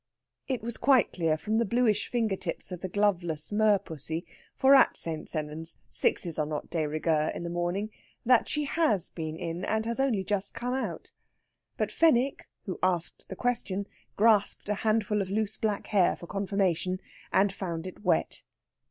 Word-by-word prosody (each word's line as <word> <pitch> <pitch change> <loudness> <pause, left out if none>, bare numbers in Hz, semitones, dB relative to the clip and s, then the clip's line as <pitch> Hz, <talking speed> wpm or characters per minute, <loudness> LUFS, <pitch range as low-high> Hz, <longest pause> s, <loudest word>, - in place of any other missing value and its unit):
It 255 -5 -2
was 235 0 -4
quite 260 0 +4
clear, 165 -3 +1
from 215 +7 0
the - - +3
bluish 230 -1 +2
finger 225 -5 +1
tips 190 - -5
of 180 -1 -6
the 185 - -4
gloveless 175 -6 0
merpussy 190 -7 0 0.3
for 270 +1 +5
at 270 - +6
St. 160 -2 -3
Sennans 155 +1 -4
sixes 170 -3 +1
are 150 - +2
not 150 -1 -5
de 160 -3 0
rigueur 155 0 +1
in - - -5
the 170 - -4
morning 175 +5 -2 0.3
that 245 -1 +4
she 300 -1 -1
has 275 - +1
been 160 -1 -5
in, 170 +1 -4
and 220 0 0
has 235 +2 -2
only 245 -8 +1
just 200 0 -2
come 245 +1 -2
out. 265 - -4 0.7
But - - -1
Fenwick, 275 -4 +2 0.2
who 185 - -4
asked 180 -2 -1
the 190 - -5
question, 205 -4 -1 0.3
grasped 210 -2 +3
a - - +3
handful 215 -1 +1
of 190 - -3
loose 215 +1 0
black 210 -2 -1
hair 195 -4 +3
for - - -10
confirmation, 190 -2 0 0.3
and 195 0 +3
found 170 -4 -4
it 185 +2 -9
wet. 175 -4 +1
195 Hz, 175 wpm, -29 LUFS, 170-220 Hz, 0.7 s, at